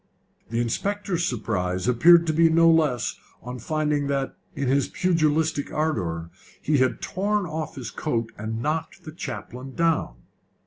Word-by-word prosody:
The 115 Hz, +1 st, -1 dB
inspector's 180 Hz, -, -1 dB
surprise 95 Hz, -5 st, -2 dB
appeared 165 Hz, +8 st, +6 dB
to 160 Hz, -, 0 dB
be 165 Hz, +1 st, +5 dB
no 165 Hz, +1 st, +5 dB
less 150 Hz, -7 st, +1 dB, 0.2 s
on 125 Hz, +1 st, -6 dB
finding 150 Hz, +1 st, 0 dB
that, 140 Hz, -1 st, -1 dB, 0.2 s
in 140 Hz, -, -2 dB
his 135 Hz, +2 st, +2 dB
pugilistic 160 Hz, -4 st, +1 dB
ardour, 85 Hz, -, -2 dB, 0.3 s
he 150 Hz, -2 st, +1 dB
had 130 Hz, 0 st, +1 dB
torn 205 Hz, +1 st, 0 dB
off 155 Hz, -2 st, -4 dB
his 125 Hz, -5 st, -6 dB
coat 115 Hz, -1 st, -2 dB
and 110 Hz, +2 st, -4 dB
knocked 155 Hz, +2 st, -2 dB
the 155 Hz, -, -8 dB
chaplain 135 Hz, -6 st, -7 dB
down. 165 Hz, -, +1 dB
150 Hz, 145 wpm, -25 LUFS, 120-160 Hz, 0.3 s, appeared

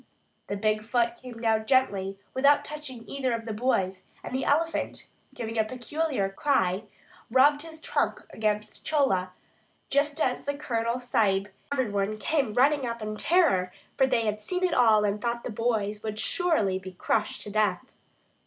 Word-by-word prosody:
The 200 Hz, -, -2 dB
big 215 Hz, +1 st, +1 dB
foot 235 Hz, +1 st, +1 dB
came 245 Hz, -2 st, -10 dB
down 220 Hz, -1 st, +1 dB
gently 195 Hz, -8 st, +2 dB, 0.2 s
without 280 Hz, +2 st, +4 dB
touching 295 Hz, -6 st, -7 dB
either 265 Hz, -3 st, -1 dB
of 230 Hz, -1 st, -3 dB
the 220 Hz, -, -3 dB
boys, 195 Hz, -5 st, 0 dB, 0.2 s
and -, -, -7 dB
the 260 Hz, -, -1 dB
elephant, 325 Hz, +3 st, 0 dB, 0.3 s
giving 225 Hz, -1 st, -3 dB
a -, -, +5 dB
peculiar 255 Hz, 0 st, -2 dB
cry, 195 Hz, -3 st, +1 dB, 0.4 s
rubbed 285 Hz, +4 st, +5 dB
his 320 Hz, 0 st, -9 dB
trunk -, -, -1 dB
against 210 Hz, -1 st, -2 dB
Chola, 195 Hz, -12 st, +1 dB, 0.6 s
just 285 Hz, +2 st, +1 dB
as 255 Hz, -4 st, 0 dB
the 285 Hz, 0 st, -1 dB
Colonel 235 Hz, -4 st, -1 dB
Sahib 205 Hz, -5 st, +1 dB, 0.2 s
and 285 Hz, -, -1 dB
every 240 Hz, -5 st, +1 dB
one 200 Hz, +1 st, -1 dB
came 265 Hz, -3 st, 0 dB
running 275 Hz, +1 st, +3 dB
up 235 Hz, 0 st, -4 dB
in 215 Hz, 0 st, -3 dB
terror, 210 Hz, -, +3 dB, 0.2 s
for 265 Hz, -, +4 dB
they 240 Hz, -3 st, +1 dB
had 210 Hz, 0 st, -1 dB
seen 360 Hz, -, -2 dB
it 360 Hz, -2 st, +2 dB
all 220 Hz, -5 st, +5 dB
and 205 Hz, +1 st, -1 dB
thought 235 Hz, 0 st, -2 dB
that -, -, -4 dB
the 225 Hz, +2 st, -5 dB
boys 210 Hz, -3 st, 0 dB
would 215 Hz, -1 st, -4 dB
surely 220 Hz, -, +1 dB
be 185 Hz, 0 st, -9 dB
crushed 210 Hz, +4 st, -1 dB
to 205 Hz, -, -7 dB
death. 215 Hz, +3 st, 0 dB
230 Hz, 175 wpm, -27 LUFS, 210-275 Hz, 0.6 s, a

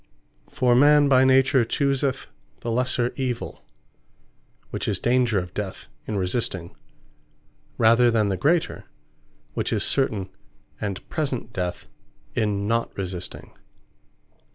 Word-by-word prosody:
For 125 Hz, -1 st, +2 dB
man 145 Hz, +3 st, +6 dB
by 130 Hz, -2 st, +5 dB
nature 130 Hz, 0 st, +4 dB
chooseth 135 Hz, +2 st, 0 dB, 0.4 s
the 115 Hz, -, -3 dB
lesser 125 Hz, 0 st, 0 dB
evill, 125 Hz, -3 st, -3 dB, 1.1 s
which -, -, -3 dB
is -, -, -1 dB
danger 120 Hz, -3 st, +2 dB
of 90 Hz, -1 st, -3 dB
death 100 Hz, -3 st, -5 dB, 0.2 s
in 105 Hz, -, -2 dB
resisting; 90 Hz, -3 st, -2 dB, 1.0 s
rather 115 Hz, +2 st, +5 dB
than 110 Hz, -3 st, +2 dB
the 95 Hz, -, 0 dB
greater, 160 Hz, -, 0 dB, 0.7 s
which -, -, -2 dB
is -, -, +1 dB
certain 105 Hz, -9 st, +1 dB, 0.5 s
and 100 Hz, -3 st, -4 dB
present 135 Hz, -7 st, -3 dB
death 90 Hz, -3 st, -4 dB, 0.5 s
in 100 Hz, -2 st, 0 dB
not 115 Hz, +1 st, -1 dB
resisting. 90 Hz, -2 st, -5 dB
120 Hz, 115 wpm, -24 LUFS, 100-130 Hz, 1.1 s, man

